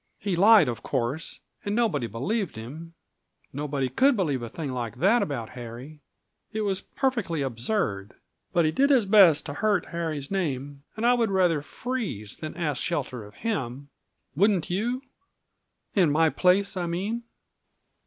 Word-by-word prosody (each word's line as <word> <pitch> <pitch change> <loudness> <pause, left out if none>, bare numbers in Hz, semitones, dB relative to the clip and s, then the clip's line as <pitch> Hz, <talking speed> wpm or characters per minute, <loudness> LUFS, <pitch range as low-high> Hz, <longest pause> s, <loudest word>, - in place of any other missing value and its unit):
He 195 -3 -2
lied, 210 - +7
of 120 -2 -3
course, 135 +4 -3 0.2
and 205 0 -2
nobody 195 - +1
believed 165 - -2
him; 155 +10 -9 0.6
nobody 140 -1 -2
could 260 - +3
believe 145 -10 0
a 120 - -5
thing 145 +2 -5
like 120 -4 -4
that 210 +8 +4
about 120 -7 -3
Harry. 125 +5 -9 0.5
It 220 0 -2
was 195 -2 -1
perfectly 230 - -1
absurd. 115 - -2 0.4
But 170 -2 +3
he 155 - +2
did 275 - +3
his 260 -7 +4
best 195 -7 +6
to 145 - -5
hurt 205 +1 0
Harry's 160 -4 -3
name, 145 -7 -2 0.2
and 220 - -1
I 245 - +6
would 235 -3 +2
rather 180 -6 +2
freeze 195 - -4
than 155 +2 -7
ask 150 -7 -1
shelter 135 -8 -2
of 105 0 -14
him. 140 - -3 0.5
Wouldn't 190 -1 +2
you 240 +8 -1 0.9
in 180 -6 +4
my 160 +1 +3
place, 195 +2 +2
I 180 -2 -2
mean?" 200 +8 -2
165 Hz, 155 wpm, -26 LUFS, 135-205 Hz, 0.9 s, lied